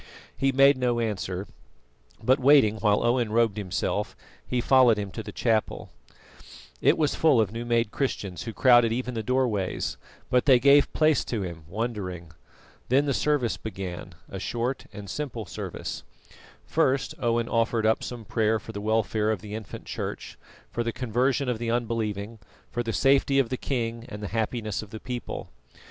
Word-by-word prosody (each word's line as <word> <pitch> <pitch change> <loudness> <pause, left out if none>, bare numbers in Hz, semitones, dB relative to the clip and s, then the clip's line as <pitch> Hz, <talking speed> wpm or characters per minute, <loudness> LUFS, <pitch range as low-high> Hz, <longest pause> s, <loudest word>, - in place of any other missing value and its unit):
He 135 0 +1
made 135 +1 +5
no 120 -2 +1
answer, 100 -4 -2 0.8
but 130 +4 +4
waiting 130 -5 +5
while 105 -1 +2
Owen 120 -2 +1
robed 115 -2 +2
himself, 95 -4 -2 0.3
he 125 - -2
followed 125 -2 +5
him 100 -2 -4
to 110 - -5
the - - -8
chapel. 110 -3 -1 0.9
It - - +4
was 150 -2 +1
full 150 -7 +4
of 105 -4 +1
new 115 +1 -5
made 115 -2 +1
Christians 100 -9 -3
who 115 - -5
crowded 120 -1 +5
even 125 +2 -2
the 115 - -2
doorways, 110 -5 -1 0.3
but 125 -1 +3
they 135 -3 +7
gave 140 +3 +5
place 155 -1 +3
to 110 -5 -2
him, 85 -3 -7
wondering. 95 -5 -4 0.6
Then 135 +4 +4
the 140 - +1
service 145 -4 +1
began 90 -4 -7
a 95 - -7
short 120 +6 -3
and 105 -1 -9
simple 120 0 -4
service. - - -6 0.6
First 135 +1 +1
Owen 115 -1 +1
offered 115 -1 +1
up 110 0 +2
some 120 -3 -6
prayer 110 +1 +1
for 110 - -9
the 100 -2 -6
welfare 110 0 +1
of 110 -5 -1
the 105 -1 -8
infant 110 -3 -7
Church, - - -5 0.4
for 120 - -2
the 115 - -1
conversion 125 +2 0
of 120 -3 -1
the 115 -1 -2
unbelieving, 115 -2 -2 0.3
for 120 - -1
the 115 -1 -2
safety 135 +2 +3
of 135 -4 +3
the 130 - -1
king 115 -3 -3
and 105 -1 -7
the 105 - -4
happiness 110 -1 -2
of 110 - -11
the 110 - -8
people. 125 0 -6
115 Hz, 175 wpm, -26 LUFS, 105-125 Hz, 0.9 s, they